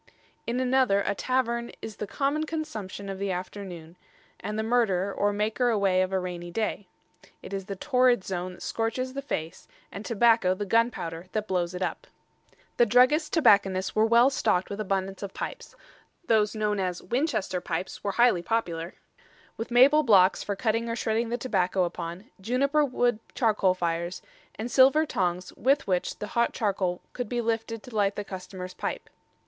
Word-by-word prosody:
In 240 +2 -1
another, 255 -5 +3
a 200 - 0
tavern 235 +1 -1
"is 215 -2 -8
the 210 - -4
common 290 +6 -1
consumption 220 -12 -5
of 195 -1 -5
the 200 0 -2
Afternoone, 180 -2 -6 0.4
and 210 0 -4
the 220 - 0
murderer, 200 -5 +1
or 205 0 +1
maker 215 +4 0
away 195 -4 +2
of 185 0 -1
a 190 - +1
rainy 175 -1 -5
day. 210 0 -2 0.6
It - - -8
is 195 -1 -3
the 195 - -5
Torrid 250 -2 +2
Zone 185 -1 -4
that - - -11
scorches 245 +3 -2
the 275 - -4
face, 165 - -5 0.2
and 200 - -7
Tobacco 225 -4 +3
the 205 - -4
gunpowder 190 -6 0
that 215 -1 -2
blows 180 -1 -1
it 180 - -2
up." - - -4 0.7
The 240 - +5
druggist 255 +7 +4
tobacconists 200 - +3
were 215 +1 +4
well 235 +4 +5
stocked 185 -9 0
with 200 - -5
abundance 195 -1 -2
of 200 -1 -6
pipes - - -6 0.5
those 215 -4 +2
known 210 -1 0
as 180 -2 -2
Winchester 220 - -1
pipes 180 +2 -4
were 200 - -1
highly 235 -6 +4
popular 175 -5 -2 0.6
with 225 - -5
maple 265 +5 +6
blocks 195 -8 +5
for 200 - -3
cutting 230 +2 0
or 230 - -1
shredding 225 0 -1
the 240 - -1
tobacco 190 -6 0
upon, 175 +2 -5 0.2
juniper 275 +8 +2
wood 245 -4 +1 0.2
charcoal 210 -6 +2
fires, 170 0 -2 0.3
and 235 +3 -5
silver 270 +5 +5
tongs 180 - -2
with 275 +4 +2
which 180 -2 -1
the 210 - -6
hot 235 0 +2
charcoal 190 -4 -1
could 245 -4 -4
be 240 - -1
lifted 225 -1 -2
to 250 - -11
light 200 -1 +2
the 205 - -3
customer's 185 -1 -8
pipe. - - -4
210 Hz, 175 wpm, -27 LUFS, 185-240 Hz, 0.7 s, maple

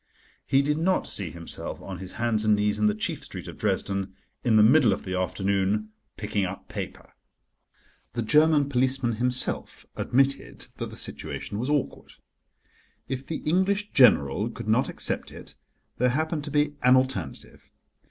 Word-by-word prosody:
He 135 +1 +3
did 150 +2 0
not 185 +3 +1
see 95 -4 -1
himself 85 +1 -5
on 95 -2 -8
his 95 0 -8
hands 110 -2 +1
and 105 -1 +4
knees 105 0 +1
in 105 - +3
the 105 - +1
chief 105 - -2
street - - -7
of - - -8
Dresden, 95 -1 -1 0.3
in 115 -3 +3
the 105 - +7
middle 120 -2 +5
of - - -5
the 95 - -5
afternoon, 100 +3 0 0.3
picking 105 -1 -2
up 95 +1 -5
paper. - - -7 1.0
The 120 - -2
German 150 +3 +4
policeman 130 -3 0
himself 125 +1 +1
admitted 135 +2 0
that - - -4
the - - -11
situation 100 - -5
was 125 +4 -2
awkward. 145 -2 -2 0.9
If 130 0 -5
the 160 - -4
English 195 +5 +1
General 70 - +4
could - - -8
not - - +2
accept - - -1
it - - -11 0.5
there 125 +1 +3
happened 155 +3 -1
to 145 - -6
be 150 0 +1
an 125 +1 +6
alternative. 130 0 -2
125 Hz, 160 wpm, -26 LUFS, 105-145 Hz, 1.0 s, the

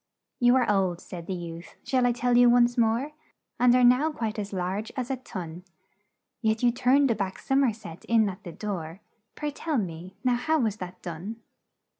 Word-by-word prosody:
"'You 245 +1 +5
are 255 -2 +3
old,' 190 -4 +1
said 170 -2 -9
the 190 - -2
youth, 170 -1 -8
'shall 255 -2 +2
I - - +3
tell 245 0 +1
you 245 0 +7
once 240 0 +4
more? 235 +5 +1 0.5
And 245 0 +5
are 250 - +4
now 250 +6 +5
quite 225 -6 -3
as 205 -1 -4
large 190 +3 -3
as 255 0 -2
a - - +1
tun; 180 -8 -8 0.8
Yet 220 0 0
you 240 - +5
turned 255 +2 +3
a - - +1
back 195 -2 -3
som 270 +1 +1
er 250 - +3
set 190 -6 -11
in 225 -2 +3
at 190 -2 -6
the 175 - -7
door 180 -2 -5 0.3
Pray, 300 -1 -3
tell 310 0 -2
me 180 -2 -5
now, 250 -2 +2
how 315 +6 +1
was 220 -7 0
that 180 -2 -9
done?' 180 +5 -6
225 Hz, 205 wpm, -27 LUFS, 185-250 Hz, 0.8 s, you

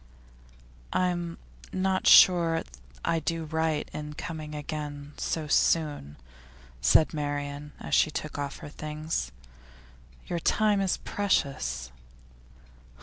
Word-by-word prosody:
'I'm 175 -2 0 0.3
not 190 0 0
sure 170 -3 +7
that 65 - -17 0.3
I 165 - +2
do 165 +2 -2
right 160 -1 -1
in 150 0 -6
coming 155 -2 -6
again 145 -1 -5
so 160 -2 -2
soon,' 145 - +1 0.7
said 155 - +4
Marian 145 -1 -4
as - - -6
she - - +5
took 155 -1 -5
off 140 -1 -3
her - - -7
things. 150 - -4 0.9
'Your 170 - -2
time 210 +3 +2
is 190 -2 +1
precious. 100 - -1
155 Hz, 110 wpm, -28 LUFS, 145-170 Hz, 0.9 s, sure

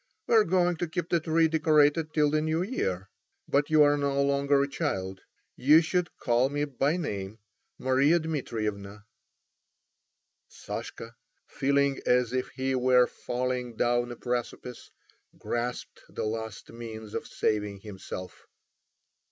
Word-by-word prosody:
"We - - 0
are 220 -2 +7
going 180 -2 +1
to 175 - -2
keep 170 +1 -4
the 170 - +2
tree 160 +1 +2
decorated 155 0 +3
till 150 -2 +2
the 155 0 +2
New 160 +2 0
Year. 95 - -3 0.4
But 145 +1 +1
you 155 -1 +6
are 145 0 +4
no 140 -1 +1
longer 140 0 +2
a - - -1
child; 95 - -3 0.3
you 150 +5 +6
should 180 +1 -1
call 120 +2 +2
me 145 +1 -1
by 145 +3 0
name—Maria 115 - -1
Dmitrievna." 105 -10 -4 1.4
Sashka, - - -7 0.3
feeling 140 0 +1
as 125 -1 +3
if 130 0 -1
he 130 0 -1
were 125 -1 +4
falling 125 -1 -3
down 120 +1 +1
a - - -6
precipice, 125 0 -5 0.5
grasped 120 +1 -4
the - - -4
last 110 -1 -5
means 110 -2 -8
of - - -4
saving 105 -2 -1
himself. 95 -3 -9
130 Hz, 135 wpm, -28 LUFS, 115-155 Hz, 1.4 s, are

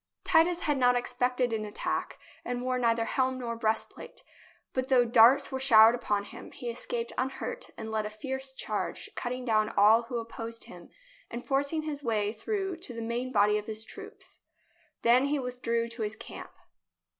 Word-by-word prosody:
Titus 345 0 +3
had 295 -3 0
not 245 -1 +4
expected 250 0 0
an 215 -1 -1
attack 210 -1 -3 0.3
and 245 0 -3
wore 255 0 0
neither 230 -1 +2
helm 260 +2 0
nor 235 -2 -4
breastplate. 220 -1 -3 0.5
But, 260 0 -1
though 255 -3 +4
darts 240 +4 +6
were 265 - -2
showered 225 -4 +7
upon 210 -4 -1
him, - - -10
he 240 -1 -5
escaped 235 0 -3
unhurt 270 - -3
and 220 -1 -6
led 215 -1 -1
a - - -6
fierce 265 +5 -5
charge, 265 - -4
cutting 250 0 -4
down 215 -2 +2
all 215 +3 +5
who 235 +1 -5
opposed 230 0 -6
him 175 -1 -12 0.4
and 235 +1 -6
forcing 285 +3 0
his 295 -2 -4
way 215 -5 0
through 385 - -3
to 290 -8 -9
the 230 - -5
main 240 +3 -2
body 210 -2 +3
of 210 - -10
his 220 0 -4
troops. 415 - -10 0.6
Then 245 +3 +5
he 290 +1 +1
withdrew 245 -3 -2
to 235 0 -8
his 215 0 -1
camp. - - -9
245 Hz, 180 wpm, -29 LUFS, 225-265 Hz, 0.6 s, showered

